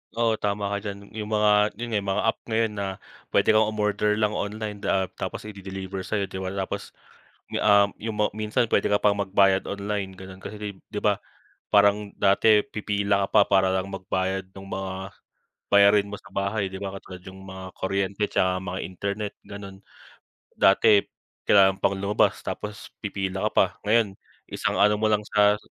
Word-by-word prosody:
Oo, 115 -1 +1
tama 100 0 -1
ka 100 - 0
diyan 100 -1 -8
'yung 105 -1 -5
mga, 105 -1 +3
'yun 120 +2 -5
nga 105 - +2 0.2
mga - - 0
app - - -25
ngayon 115 -1 +1
na 100 - -1 0.4
puwede - - +2
kang 110 0 +4
umorder 105 0 +1
lang 105 -1 +1
online 105 0 -4
da 95 -1 +1
ah, - - -4
tapos - - -5
i-de-deliver 95 -2 -7
sayo 100 +2 -2
di 95 - -5
ba 95 - -4
tapos 95 0 -4 0.6
'yung, - - -1
um, 100 -1 +5 0.3
ma 105 - +2
minsan 110 +2 0
puwede 115 - +1
ka 105 - +3
pang 100 0 +2
magbayad 95 -1 +3
online 100 -1 -3
gano'n 95 0 -11
kasi 105 - -8
kai 105 -1 -5
di - - -7
ba - - +2 0.5
parang 100 0 +4
dati 105 +2 +5
pipila 100 -4 -1
ka - - -4
pa 105 - +7
para 95 -1 +4
lang 95 - -7
magbayad 95 0 -2
nung 95 0 -11
mga 95 0 -5 0.6
bayarin 100 0 +5
mo 105 - -6
sa - - -17
bahay 100 0 -1
di 95 - -6
ba 100 -1 -5
katulad 95 -1 -10
'yung 95 +1 -12
mga 95 0 -9
kuryente 100 +1 -2
'tsaka 95 -2 +1
mga 95 0 -4
internet, 100 +2 -4
gano'n. 100 -1 -9 0.8
Dati 100 +1 +5 0.5
kailangan 95 -1 +5
pang 100 - +1
lumabas 100 +2 +2
tapos 105 +1 -6
pipila 95 -1 -2
ka - - -19
pa, - - +6 0.2
ngayon 110 -2 +3 0.4
isang - - -1
ano 105 +1 +4
mo 110 - +3
lang 105 -1 +1
sa 105 0 +4
100 Hz, 180 wpm, -25 LUFS, 95-105 Hz, 0.8 s, pa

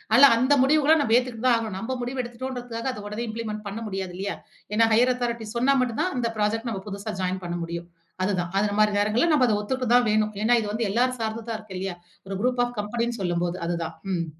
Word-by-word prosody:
அல்ல 265 +4 +9
அந்த 260 +4 +3
முடிவுகள 305 +2 +5
நம்ம 225 -4 +3
ஏத்துக்கிட்டு 250 -1 -2
தான் 245 - +6
ஆகணும். 220 -4 -4
நம்ம 255 +5 -3
முடிவு 250 +2 -3
எடுத்துட்டோம்ங்கறதுக்காக 245 0 -4
அத 250 - -7
உடனே 215 +3 -4
இம்ப்ளிமெண்ட் 220 -1 -5
பண்ண 200 +3 -5
முடியாது 190 -3 -4
இல்லயா. 200 +1 -3 0.4
ஏன்னா 225 +1 +4
ஹையர் 250 +3 +4
அதாரிட்டி 235 -2 -3
சொன்னா 260 +4 +3
மட்டும் 235 -3 -1
தான் 370 - 0
அந்த 235 -1 0
புராஜெக்ட் 225 +3 0
நம்ம 195 -2 -4
புதுசா 200 +2 -5
ஜாயின் 185 +1 -1
பண்ண 175 0 -3
முடியும். 170 +1 -5 0.4
அதுதான் 180 -3 -1
அந்த 205 +1 +2
மாரி 210 0 +5
நேரங்கள்ல 225 +11 +2
நம்ம 265 -4 +5
அத 215 - +2
ஒத்துக்கிட்ட 255 +3 -2
தான் 245 -2 +4
வேணும். 215 0 +1
ஏன்னா 240 +2 +5
இது 210 - -4
வந்து 225 0 0
எல்லாரும் 250 +3 +1
சார்ந்ததா 225 +1 -3
இருக்கு 215 -3 -10
இல்லயா. 190 -2 -4 0.3
ஒரு 195 - -4
குரூப் 250 +1 +1
ஆஃப் 245 0 -7
கம்பெனினு 235 +2 -2
சொல்லும்போது 175 -1 -1
அதுதான். 170 -1 -2 0.2
ம். 170 -1 0
225 Hz, 215 wpm, -25 LUFS, 205-245 Hz, 0.4 s, அல்ல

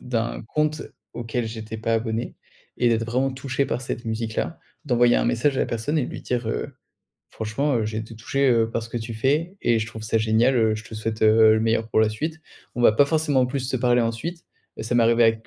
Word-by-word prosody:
d'un 120 -3 -3
compte 155 0 0 0.3
auquel 120 0 -3
j'étais 110 0 -6
pas 115 +1 -1
abonné 115 0 -2 0.4
et 120 - +3
d'être 115 -1 +1
vraiment 130 +4 0
touché 130 +1 -2
par 120 - -2
cette 120 -2 -5
musique-là. 110 +7 -3 0.3
D'envoyer 120 -3 +3
un - - +1
message 130 +4 +1
à - - +1
la - - +1
personne 130 +7 -1
et 130 - +1
lui - - -8
dire 120 -2 -2
heu: - - -3 0.6
«Franchement, 125 +6 -1
heu, 110 -2 0
j'ai 110 0 -3
été 110 +1 -7
touché, 135 +4 0
heu, 115 -2 +3
par 115 - -2
ce 115 - -9
que - - -4
tu 115 0 -6
fais 150 - 0
et 115 -1 +3
je 110 - -2
trouve 110 -1 -9
ça 115 +1 +1
génial 110 +4 +3
heu, 110 -2 +3
je 110 - -7
te - - -10
souhaite, 110 0 -4
heu, 110 0 +6
le 110 - +1
meilleur 115 0 0
pour 110 - +2
la 110 - +4
suite.». 155 +9 -4 0.4
On 120 - -2
va 110 - +7
pas 140 +6 +4
forcément 145 -5 +2
plus 135 +2 -3
se 130 - 0
parler 120 0 +3
ensuite, 115 +10 -4 0.3
mais - - -5
ça 115 +2 -2
m'est 120 -1 +4
arrivé 115 +1 +4
avec 115 0 +1
115 Hz, 240 wpm, -23 LUFS, 110-130 Hz, 0.6 s, va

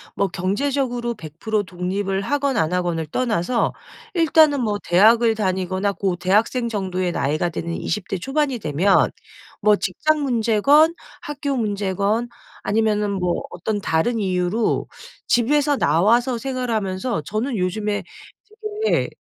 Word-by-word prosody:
뭐 200 - +1
경제적으로 240 +5 -1
100% 205 +5 -3
독립을 190 +2 -2
하건 280 +3 0
안 160 +1 +1
하건을 175 -3 -1
떠나서 230 +3 0 0.4
일단은 315 -5 +4
뭐 210 -3 0
대학을 225 +6 +5
다니거나 190 -1 -1
고 190 -2 -1
대학생 215 +7 +1
정도의 185 -4 -2
나이가 155 +4 0
되는 170 +1 -4
20 210 +2 -3
대 195 - -2
초반이 270 - -1
되면 175 +3 +2 0.5
뭐 210 0 +5
직장 300 - 0
문제건 270 +5 +3 0.3
학교 285 -1 -3
문제건 205 +1 -1 0.3
아니면은 210 -1 +1
뭐 180 -3 -1
어떤 205 +4 -3
다른 220 +10 0
이유로 185 +2 0 0.4
집에서 285 +4 +2
나와서 230 - +2
생활하면서 230 - -2
저는 225 - -2
요즘에 205 +3 -1 0.8
되게 - - +1
210 Hz, 275 characters per minute, -21 LUFS, 185-245 Hz, 0.8 s, 대학을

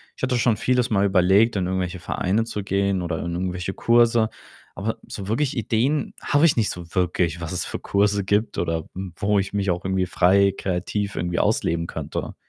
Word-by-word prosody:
ich - - -15
hatte 130 -1 +1
schon 115 -2 +2
vieles 125 0 +1
mal 100 -1 +3
überlegt, 95 +4 +4
in 95 -2 0
irgendwelche 95 0 -2
Vereine 100 +7 0
zu 105 -2 -4
gehen 100 -1 0
oder 85 -2 -2
in 85 - -3
irgendwelche 90 +1 -3
Kurse, 115 -1 +3 0.5
aber 110 +3 -3
so 100 -2 -7
wirklich 130 +4 0
Ideen 125 +6 0
habe 145 +3 +3
ich 160 - +4
nicht 110 - +2
so 85 -1 -6
wirklich, 85 -2 0
was 80 - -5
es 90 - -2
für - - -5
Kurse 100 0 +1
gibt 105 +3 0
oder, 85 -2 -2
hm, 95 -2 -6
wo 105 0 +1
ich 95 - -3
mich 100 -2 0
auch 90 +1 -3
irgendwie 95 -1 0
frei 95 +2 +3
kreativ 100 +3 -2
irgendwie 85 0 -1
ausleben 85 0 +1
könnte. - - -5
100 Hz, 195 wpm, -23 LUFS, 90-110 Hz, 0.5 s, überlegt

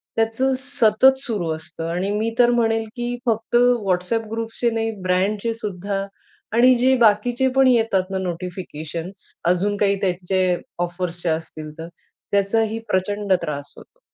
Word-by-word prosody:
त्याचं 225 +4 +1
सतत 265 -1 +4
सुरू 210 -11 -3
असतं. 165 +1 -6
आणि 180 +4 -1
मी 220 +2 -1
तर 240 - +6
म्हणेल 225 -2 +1
की 240 0 -3
फक्त 225 0 -1 0.3
WhatsApp 190 +5 0
ग्रुप्सचे 230 +1 -1
नाही, 225 -1 -1
ब्रँडचे 200 +5 0
सुद्धा 200 -2 -4 0.5
आणि 255 +1 +6
जे 260 +2 +4
बाकीचे 240 +3 +3
पण 270 -1 +5
येतात 225 -6 +3
ना 190 - -1
नोटिफिकेशन्स 175 -1 -6 0.2
अजून 200 +3 +1
काही 200 -1 +2
त्यांचे 185 -1 +1 0.2
ऑफर्सचे 175 -1 -2
असतील 155 -1 -4
तर, 165 - -6 0.4
त्याचाही 220 +3 +1
प्रचंड 205 +1 0
त्रास 145 -1 -5
होतो. - - -17
205 Hz, 135 wpm, -22 LUFS, 180-230 Hz, 0.5 s, तर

